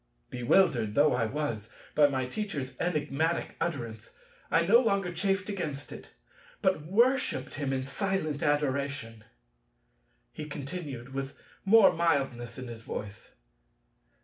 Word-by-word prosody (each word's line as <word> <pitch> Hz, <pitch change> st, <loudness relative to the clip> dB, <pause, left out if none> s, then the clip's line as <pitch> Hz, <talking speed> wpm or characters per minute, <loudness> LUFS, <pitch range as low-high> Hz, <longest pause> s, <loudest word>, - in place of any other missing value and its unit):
Bewildered 125 Hz, -, +2 dB
though 150 Hz, +1 st, +5 dB
I 115 Hz, -, +1 dB
was 115 Hz, -5 st, -3 dB, 0.2 s
by 150 Hz, -1 st, +6 dB
my 130 Hz, -2 st, -1 dB
Teacher's 140 Hz, -5 st, -4 dB
enigmatic 160 Hz, -1 st, -1 dB
utterance, 120 Hz, -10 st, -4 dB, 0.3 s
I 165 Hz, +2 st, +3 dB
no 225 Hz, +7 st, +7 dB
longer 200 Hz, -7 st, +1 dB
chafed 195 Hz, +2 st, 0 dB
against 155 Hz, -9 st, -4 dB
it, -, -, -10 dB, 0.5 s
but 185 Hz, -6 st, +1 dB
worshipped 235 Hz, -, +2 dB
him 140 Hz, -2 st, -2 dB
in 130 Hz, -1 st, -1 dB
silent 155 Hz, 0 st, -2 dB
adoration. 140 Hz, -6 st, -1 dB, 1.1 s
He 155 Hz, -, -6 dB
continued, 140 Hz, -4 st, -6 dB
with 135 Hz, 0 st, -4 dB, 0.3 s
more 200 Hz, 0 st, +7 dB
mildness 135 Hz, -8 st, 0 dB
in 130 Hz, -1 st, -6 dB
his 115 Hz, -1 st, -8 dB
voice. 105 Hz, -2 st, -7 dB
145 Hz, 120 wpm, -29 LUFS, 130-180 Hz, 1.1 s, no